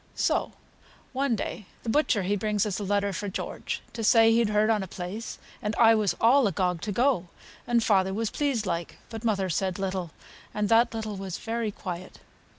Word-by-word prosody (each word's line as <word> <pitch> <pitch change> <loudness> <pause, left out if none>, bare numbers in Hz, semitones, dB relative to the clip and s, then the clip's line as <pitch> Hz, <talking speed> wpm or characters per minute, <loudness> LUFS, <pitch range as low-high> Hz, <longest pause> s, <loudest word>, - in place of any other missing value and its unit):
So, - - 0 0.6
one 265 -2 +1
day, 210 -1 -5 0.2
th' 225 - 0
butcher 230 -7 +2
he 200 +3 +1
brings 210 0 0
us 200 -2 -2
a - - -3
letter 200 0 0
fra 205 +3 -3
George, - - -4
to 230 - -4
say 225 0 +6
he'd 230 -1 +3
heard 210 +1 +3
on 215 -2 +2
a 190 - -5
place 185 +6 -6 0.2
and 210 +1 -2
I 225 -1 +6
was 210 -5 +1
all 245 +2 +5
agog 180 -3 0
to 210 - -3
go, 235 -4 +2 0.4
and 235 -1 +2
father 190 -3 +3
was 220 +2 -2
pleased, 275 -7 0
like; 170 -2 -3
but 225 0 -6
mother 200 -4 +1
said 185 +1 -1
little, 190 -3 -2 0.5
and 210 -1 0
that 230 +1 +4
little 215 -2 -4
was 190 -2 -5
very 230 -1 -2
quiet. 185 -3 -7
210 Hz, 195 wpm, -27 LUFS, 190-225 Hz, 0.6 s, say